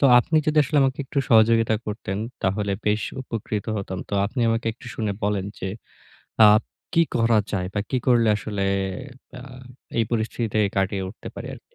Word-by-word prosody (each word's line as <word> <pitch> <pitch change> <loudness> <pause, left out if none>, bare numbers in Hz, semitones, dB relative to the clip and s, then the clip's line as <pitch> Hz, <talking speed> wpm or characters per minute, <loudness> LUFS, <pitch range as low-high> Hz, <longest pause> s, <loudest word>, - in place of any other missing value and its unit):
তো - - +3
আপনি 160 +6 +1
যদি 155 0 +2
আসলে 145 +2 +1
আমাকে 135 -1 +1
একটু 135 - -3
সহযোগিতা 115 0 +5
করতেন 105 -2 -4 0.2
তাহলে 100 +1 0
বেশ 105 0 +2 0.2
উপকৃত 110 -4 -4
হতাম। 95 -2 -4
তো 100 - -3
আপনি 120 +5 -4
আমাকে 115 0 0
একটু 120 - -15
শুনে 110 -3 -1
বলেন 100 -2 0
যে 95 - -3 0.8
আব 110 +2 +4 0.3
কী 165 - +6
করা 115 -1 +4
যায় 90 -3 -1
বা 105 - 0
কী 130 - +1
করলে 120 -3 +4
আসলে 105 -1 -4 0.7
প্যা 125 -1 -10 0.6
এই 115 - +3
পরিস্থিতিতে 110 -1 -1 0.2
কাটিয়ে 95 0 0
উঠতে 115 - -10
পারি - - -7
আরকি? - - -19
110 Hz, 175 wpm, -24 LUFS, 100-120 Hz, 0.8 s, কী